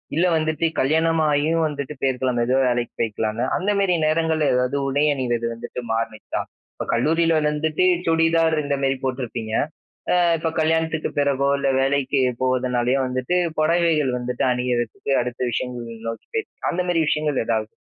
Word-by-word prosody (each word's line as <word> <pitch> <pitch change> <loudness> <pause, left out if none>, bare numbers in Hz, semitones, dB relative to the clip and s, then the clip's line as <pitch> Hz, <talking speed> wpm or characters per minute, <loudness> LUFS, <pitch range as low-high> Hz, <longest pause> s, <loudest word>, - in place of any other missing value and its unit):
இல்ல 170 +3 +3
வந்துட்டு 155 +1 0
கல்யாணமாகியும் 160 +1 +2
வந்துட்டு 145 -1 -5
போயிருக்கலாம். 130 -1 0
அந்த 120 -1 +1
எதோ 130 +1 +2
வேலைக்கு 120 -1 -1
போயிருக்கலாம்ல. 110 +1 -1
அந்த 200 +3 0
மேரி 195 -2 +2
நேரங்கள்ல 160 -1 +1
எதாவது 125 +2 +1
உடை 140 +2 +1
அணிந்தது 120 -4 -1
வந்துட்டு 115 +2 -7
மாறுனுச்சா? 115 -1 -3 0.3
இப்ப - - -5
கல்லூரியில 165 +7 +2 0.2
வந்துட்டு 150 +2 0 0.2
சுடிதார் 165 0 +3
இந்த 140 0 0
மேரி 135 0 +2
போட்டுருப்பீங்க. 125 -4 -3 0.6
அ - - +4 0.2
இப்ப 160 +1 -1
கல்யாணத்துக்கு 160 0 0
பிறகோ, 140 -1 +1
இல்ல 140 0 0
வேலைக்கு 135 0 +1 0.2
போறதுனாலயோ 130 0 +1
வந்துட்டு, 130 +7 -1 0.2
புடவைகள் 160 -4 +2
வந்துட்டு 125 0 -2
அணியரதுக்கு 125 +1 -2
அடுத்த 120 0 -6
விஷயங்கள் 115 -2 -5
நோக்கி 115 0 -6
போய் 445 -1 -1 0.2
அந்த 180 - -2
மேரி 165 -2 +2
விஷயங்கள் 150 -3 0
எதாவது? 110 -1 -1
140 Hz, 145 wpm, -22 LUFS, 125-160 Hz, 0.6 s, அ